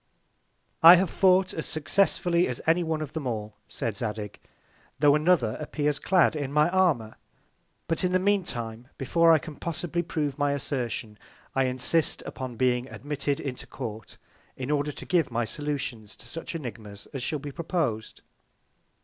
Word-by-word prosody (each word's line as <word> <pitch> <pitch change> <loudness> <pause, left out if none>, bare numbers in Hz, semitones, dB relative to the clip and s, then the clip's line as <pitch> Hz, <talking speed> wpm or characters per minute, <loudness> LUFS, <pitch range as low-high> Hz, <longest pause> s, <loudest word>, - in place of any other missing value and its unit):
I 170 +2 +11
have 185 -1 +1
fought 185 -1 +4
as 160 - -4
successfully 175 +2 +2
as 125 - -3
any 165 +2 +3
one 160 -1 -1
of 145 - -8
them 155 -5 -3
all, 110 -3 -3
said 115 -3 -3
Zadig, 105 -1 -4 0.6
tho' 145 -1 +5
another 150 -7 +2
appears 150 -1 -1
clad 180 -3 +3
in 140 -3 -3
my 150 +3 +4
Armour; 160 -13 +1 0.7
but 165 +2 0
in 180 - +2
the 185 - +4
mean 200 +1 +2
Time, 120 -5 -5
before 165 +5 +4
I 160 - +7
can 155 0 -8
possibly 170 0 -2
prove 150 -4 -3
my 145 0 +2
Assertion, 120 -6 -3 0.3
I 135 0 +2
insist 130 +5 0
upon 130 -2 -6
being 125 +1 +1
admitted 145 0 -2
into 130 -3 -5
Court, 110 -5 -7 0.4
in 130 +2 -3
order 150 0 +1
to - - -10
give 170 -5 +2
my 120 -1 -1
Solutions 130 -5 -4
to - - -15
such 165 +7 -7
Ænigmas 110 -8 -7
as 135 - -4
shall 150 +4 -1
be 145 0 -7
propos'd. 150 - -3
145 Hz, 165 wpm, -27 LUFS, 120-165 Hz, 0.7 s, I